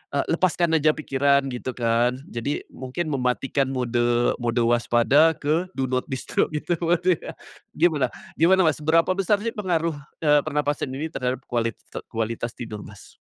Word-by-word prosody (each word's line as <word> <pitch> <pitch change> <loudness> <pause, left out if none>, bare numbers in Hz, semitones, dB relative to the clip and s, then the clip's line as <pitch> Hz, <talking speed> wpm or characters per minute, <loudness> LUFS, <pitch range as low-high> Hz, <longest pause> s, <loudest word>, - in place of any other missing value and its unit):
eee, 140 - +1
lepaskan 170 -1 +1
aja 155 - +4
pikiran, 140 -2 +2
gitu 125 - -5
kan, 120 +1 +1
jadi 120 +5 -4
mungkin 145 +5 -4
mematikan 135 +1 0
mode 120 -2 +1
mode 120 0 -1
waspada 120 +7 +3
ke 160 +5 0
do 135 - +1
not 130 0 0
disturb 130 -1 -1
gitu 155 +3 -2
pasti, 175 +2 +2
ya. - - -7 0.4
Gimana, 150 -6 +2 0.2
gimana, 185 +2 +4
Mas? 155 -1 +1
Berapa 165 +4 +3
besar 195 +2 +1
sih 230 - -1
pengaruh, 170 -5 -1 0.2
eee, 150 -2 +4
pernapasan 145 -1 -1
ini 150 - -3
terhadap 130 +1 -3
kualit 115 -2 -1 0.3
kualitas 115 +1 -3
tidur, 110 -4 -6
Mas? - - -14
140 Hz, 155 wpm, -24 LUFS, 125-165 Hz, 0.4 s, aja